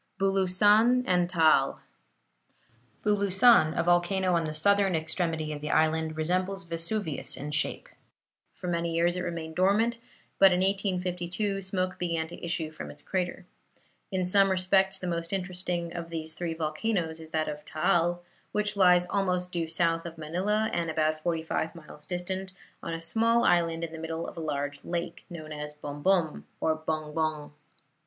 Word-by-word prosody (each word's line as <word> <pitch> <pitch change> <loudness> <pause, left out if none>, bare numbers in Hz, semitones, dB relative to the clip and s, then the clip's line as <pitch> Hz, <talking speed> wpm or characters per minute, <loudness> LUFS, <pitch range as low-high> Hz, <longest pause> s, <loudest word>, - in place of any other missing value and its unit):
BULUSAN 205 +5 +4
AND 180 -3 +2
TAAL 155 -6 +3 1.3
Bulusan, 200 -3 +4
a 170 - +2
volcano 175 +2 +2
on 165 -1 +2
the 155 - -3
southern 200 +3 +3
extremity 160 -1 -1
of 145 - -7
the 150 - -4
island, 160 0 +1
resembles 185 +4 0
Vesuvius 165 0 -2
in 150 +2 -5
shape. 150 - 0 0.7
For 180 - -7
many 170 -1 -1
years 170 +1 +2
it 180 - -2
remained 165 -2 -5
dormant, 220 +5 +2 0.4
but 195 -1 +8
in 180 0 +2
1852 190 0 -1
smoke 185 -1 -2
began 170 -2 -1
to - - -11
issue 165 -2 -2
from 155 - -8
its - - -12
crater. 185 -1 -3 0.7
In 185 -1 0
some 195 +2 +4
respects 190 +1 +2
the 185 - -7
most 170 -1 -3
interesting 180 -2 -3
of 170 -1 -5
these 160 -1 -4
three 165 -1 -4
volcanoes 160 +1 -2
is 160 -1 -11
that 160 -1 -1
of 150 0 -5
Taal, 175 +2 +1 0.3
which 210 0 0
lies 180 -2 +5
almost 180 -2 -1
due 170 -3 -2
south 165 0 +1
of 165 0 -10
Manila 190 +8 -1
and 170 -1 -1
about 155 0 0
forty 165 -1 -1
five 160 +1 -2
miles 150 -2 -12
distant, 185 +1 -4 0.3
on 165 - -4
a - - -5
small 230 +7 +2
island 170 -1 +2
in 165 - -4
the 160 - -8
middle 165 +1 -4
of - - -8
a - - -6
large 145 -2 -3
lake, 175 0 -4
known 155 -3 -8
as 150 0 -6
Bombom 150 +3 0
or 160 - +1
Bongbong. 155 -1 -3
175 Hz, 165 wpm, -28 LUFS, 160-190 Hz, 1.3 s, but